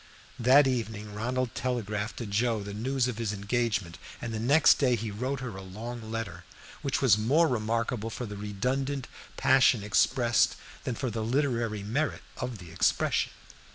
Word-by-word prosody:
That 130 +4 +6
evening 110 -5 -2
Ronald 125 +3 -2
telegraphed 110 -4 -2
to 120 - -4
Joe 110 +1 0
the 100 0 -6
news 125 +4 0
of 120 -3 -4
his 115 -3 -1
engagement, 100 -3 -1 0.2
and 115 -2 -5
the 110 - -2
next 140 +7 +5
day 125 -4 +3
he 110 -1 -4
wrote 130 +6 -3
her 120 -6 -5
a 95 - -7
long 110 +4 -7
letter, 115 -4 -4 0.4
which - - -1
was 105 - +5
more 145 +10 +4
remarkable 115 -1 -1
for 120 - -5
the 105 -2 -7
redundant 130 +7 -2 0.3
passion 130 -4 +4
expressed 115 +3 +3 0.3
than 125 - -1
for 125 +1 -2
the 110 0 -3
literary 115 -4 0
merit 140 +9 -1
of 125 -2 -4
the 90 -3 -11
expression. - - +1
115 Hz, 165 wpm, -29 LUFS, 105-125 Hz, 0.4 s, That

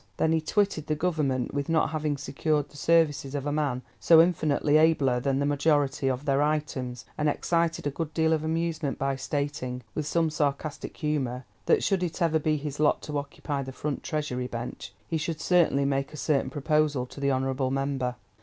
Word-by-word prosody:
Then 160 - +2
he 160 -1 +2
twitted 195 -2 0
the 155 - +1
Government 150 -7 0
with 140 +1 -2
not 165 -1 +2
having 155 -2 -1
secured 145 +1 -1
the - - -19
services 145 -3 +2
of 140 -1 -3
a 145 - 0
man 145 -4 -1 0.2
so 165 -1 +7
infinitely 155 -3 +3
abler 145 -6 +3
than 135 +1 0
the 140 - +1
majority 145 -1 +1
of 130 +2 -1
their 140 -1 +2
"items," 145 -5 -2
and 150 0 +2
excited 165 +1 0
a 145 - 0
good 155 +2 -4
deal 160 0 +2
of 155 -1 0
amusement 160 -3 -1
by 135 0 0
stating, 130 -2 -3
with 150 -1 -3
some 165 0 +1
sarcastic 150 0 -2
humour, 130 -5 -2 0.2
that, - - +4
should 195 -3 +1
it 175 -1 -3
ever 165 -3 +2
be 155 0 +1
his 145 -1 -5
lot 150 -1 +2
to 150 -1 -2
occupy 140 0 -4
the 135 0 -6
front 145 +2 -4
Treasury 135 -5 -2
bench, 120 -1 -6 0.2
he 160 - -1
should 155 0 -3
certainly 160 -6 +3
make 135 0 0
a - - -7
certain 145 -1 +1
proposal 150 -3 +1
to 125 - -12
the 140 0 +1
honourable 130 0 0
member. 135 -2 -1
145 Hz, 195 wpm, -27 LUFS, 135-155 Hz, 0.2 s, so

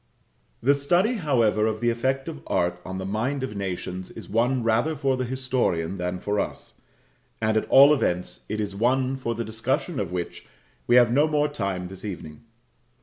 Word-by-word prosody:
The 140 +4 +5
study, 175 - +2
however, 115 - +2
of 110 -1 -2
the 120 +1 +2
effect 130 +3 -1
of 70 - -6
art 90 0 0
on 95 0 -6
the 95 - -4
mind 120 +8 -1
of 130 -5 -4
nations 95 -1 -4
is - - -10
one 120 +3 +1
rather 115 +8 +1
for 135 -2 +1
the 130 0 -2
historian 120 -9 -1
than 90 0 -2
for 105 +2 -1
us; - - -4 0.7
at 110 0 0
all 140 +2 +8
events 90 -10 -1
it 105 +1 -2
is 100 -2 -3
one 130 +4 +1
for 120 -3 -3
the 115 0 -3
discussion 125 - -2
of 90 -7 -3
which 90 -1 -5 0.4
we 120 - +5
have 120 -2 +6
no 145 +5 +4
more 150 -1 +2
time 100 -10 -3
this 95 0 -11
evening. 80 -7 -7
115 Hz, 185 wpm, -25 LUFS, 95-135 Hz, 0.7 s, all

